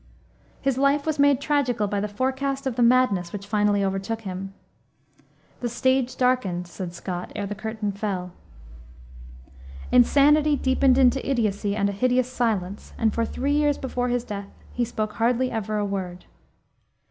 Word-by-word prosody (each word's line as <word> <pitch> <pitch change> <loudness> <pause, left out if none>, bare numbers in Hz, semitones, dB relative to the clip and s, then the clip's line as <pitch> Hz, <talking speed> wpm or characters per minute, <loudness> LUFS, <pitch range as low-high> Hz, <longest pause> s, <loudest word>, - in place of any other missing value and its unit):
His 270 -1 0
life 280 +1 +2
was 310 -2 -1
made 285 -2 +5
tragical 270 -7 +1
by 205 0 -1
the 210 - -1
forecast 265 +5 -2
of 260 -3 -1
the 245 - 0
madness 235 -8 +3
which 200 -1 -6
finally 205 -1 +1
overtook 195 +4 -2
him. 190 -1 -6 1.1
"The 240 - -2
stage 260 +1 +1
darkened," 210 -9 +1
said 175 0 -7
Scott, 180 0 -5
"ere 205 - -2
the 200 - -4
curtain 215 0 -4
fell." 195 -3 -4 1.6
Insanity 290 +4 +5
deepened 260 -1 +3
into 265 0 +4
idiocy 210 -6 0
and 200 -2 +1
a - - -1
hideous 250 +4 +1
silence, 210 -6 -2
and 220 -1 +1
for 230 - 0
three 280 +5 -1
years 295 -1 +2
before 250 -2 -2
his 245 -1 0
death 200 -2 -6 0.3
he 245 - 0
spoke 215 -2 -3
hardly 245 +2 +1
ever 215 -1 -2
a 205 - 0
word. 185 -3 -5
230 Hz, 160 wpm, -24 LUFS, 200-260 Hz, 1.6 s, made